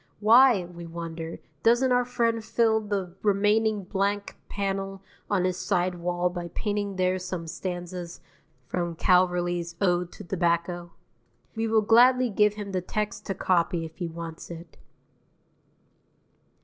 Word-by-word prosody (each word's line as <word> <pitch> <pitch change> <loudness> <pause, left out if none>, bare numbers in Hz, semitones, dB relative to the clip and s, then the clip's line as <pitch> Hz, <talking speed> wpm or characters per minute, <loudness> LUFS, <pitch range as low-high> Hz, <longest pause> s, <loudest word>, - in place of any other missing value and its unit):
Why, 230 -1 +6
we 170 -1 -10
wonder, 165 -1 -6 0.2
doesn't 240 +5 +4
our 245 0 +3
friend 230 -2 0
fill 220 0 +2
the 200 -4 -3
remaining 210 +1 +2
blank 200 +2 -1
panel 195 -1 -3 0.3
on 190 -3 +1
his 185 -1 0
side 180 0 0
wall 175 0 -1
by 175 -1 -5
painting 205 -2 -2
there 185 0 +1
some 180 -2 -5
stanzas 175 +1 -6 0.5
from 175 -2 -3
Calverley's 175 -1 +2
"Ode 180 -2 +1
to - - -10
Tobacco?" 175 -1 -1 0.6
We 225 0 -1
will 220 -1 +3
gladly 245 +3 +5
give 210 +1 +3
him 205 -2 -6
the 185 -1 -1
text 210 +4 -4
to 195 - -2
copy 170 -2 +1
if 160 0 -11
he 175 - -3
wants 165 0 -8
it. 170 -1 -10
185 Hz, 135 wpm, -26 LUFS, 175-210 Hz, 0.6 s, Why